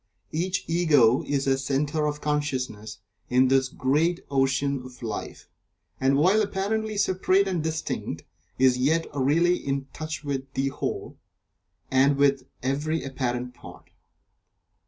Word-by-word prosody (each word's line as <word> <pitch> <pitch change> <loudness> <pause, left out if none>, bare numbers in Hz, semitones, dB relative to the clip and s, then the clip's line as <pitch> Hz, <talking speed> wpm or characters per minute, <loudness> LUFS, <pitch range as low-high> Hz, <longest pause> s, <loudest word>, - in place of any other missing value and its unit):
Each 180 +4 -1
Ego 145 -8 +4
is 140 -1 0
a 135 -1 +2
Centre 145 +3 0
of 150 0 -3
Consciousness 130 -8 -2 0.3
in 125 +1 +4
this 135 -1 +3
great 155 +9 +1
ocean 135 0 +1
of 125 -1 -12
Life, 110 -2 -6 0.5
and 135 +1 +3
while 185 +9 +4
apparently 215 +2 -1
separate 190 0 +2
and 180 -4 -1
distinct, 160 0 -3 0.3
is 130 -1 +4
yet 160 +6 +2
really 160 +6 +3
in 135 0 -3
touch 155 0 -5
with 135 -2 -4
the 135 +1 +1
Whole, - - -5 0.7
and 135 +2 +4
with 140 -2 +2 0.2
every 150 +5 -1
apparent 125 -2 -3
part. - - -14
140 Hz, 130 wpm, -26 LUFS, 130-160 Hz, 0.7 s, Ego